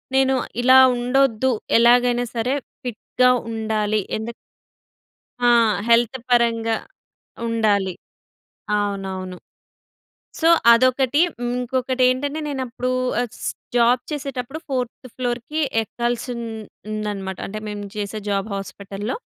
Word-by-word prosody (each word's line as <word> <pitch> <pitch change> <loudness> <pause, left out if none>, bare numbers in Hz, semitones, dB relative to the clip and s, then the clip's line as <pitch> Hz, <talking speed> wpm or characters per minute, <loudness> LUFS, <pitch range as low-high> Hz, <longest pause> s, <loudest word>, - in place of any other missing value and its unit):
నేను 265 0 +4 0.3
ఇలా 260 +1 +7 0.2
ఉండొద్దు, 255 0 +2 0.3
ఎలాగైనా 245 +1 +4
సరే 235 +3 0 0.3
ఫిట్‍గా 250 +1 +1 0.2
ఉండాలి. 215 -1 0 0.2
ఎందుకు 225 +2 -5 1.1
ఆ! - - +7 0.4
హెల్త్ 235 +2 +4
పరంగా 230 -2 +2 0.7
ఉండాలి. 205 -5 +1 0.8
అవునవును. 190 -3 -3 1.0
సో, 325 - +4 0.2
అదొకటి. 255 +3 +3 0.3
ఇంకొకటి 255 +1 -1
ఏంటంటే, 285 +4 -1
నేను 270 -2 -3
అప్పుడు 250 +1 -3 0.3
ఆహ్, 245 - -1 0.2
స్ - - +1 0.3
జాబ్ 240 +1 +4
చేసేటప్పుడు 275 -1 -4
ఫోర్త్ 255 -1 -3
ఫ్లోర్‌కి 245 +4 -2 0.2
ఎక్కాల్సి 240 +3 -3
ఉం 235 - -5 0.5
ఉందన్నమాట. 205 -3 -4
అంటే 215 +2 -6
మేము 205 -1 -5
చేసే 210 +1 -3
జాబ్ 200 +1 -1
హాస్పిటల్‍లో, 200 +2 -5
235 Hz, 105 wpm, -22 LUFS, 215-255 Hz, 1.1 s, ఇలా